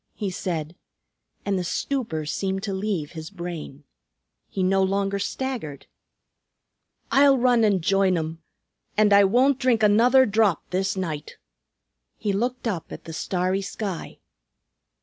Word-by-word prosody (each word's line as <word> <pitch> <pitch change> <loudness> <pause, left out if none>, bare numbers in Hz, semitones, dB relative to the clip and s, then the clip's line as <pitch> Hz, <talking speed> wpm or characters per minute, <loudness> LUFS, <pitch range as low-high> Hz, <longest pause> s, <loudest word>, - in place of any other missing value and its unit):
he 205 -3 -3
said, 165 -3 -4 0.7
and 195 -2 0
the - - -2
stupor 175 - -2
seemed 190 +5 -2
to 200 -3 -2
leave 190 -6 -2
his 160 -2 -8
brain. 170 -6 -7 0.7
He 190 - -2
no 195 +1 +3
longer 195 +1 0
staggered. 205 - -4 1.3
"I'll 275 0 +6
run 245 -2 +3
an' 200 -4 +3
join 195 +1 +2
'em, 160 0 -4 0.6
an' 210 -1 +5
I 200 0 +7
won't 255 +6 +3
drink 245 -4 +2
another 240 +6 +5
drop 210 -6 +1
this 190 +2 -1
night." 155 -5 -4 0.8
He 205 - -1
looked 245 +4 -2
up 185 -8 -3
at - - -8
the 165 - -8
starry 185 +3 -1
sky. 195 -2 -5
195 Hz, 135 wpm, -24 LUFS, 175-220 Hz, 1.3 s, I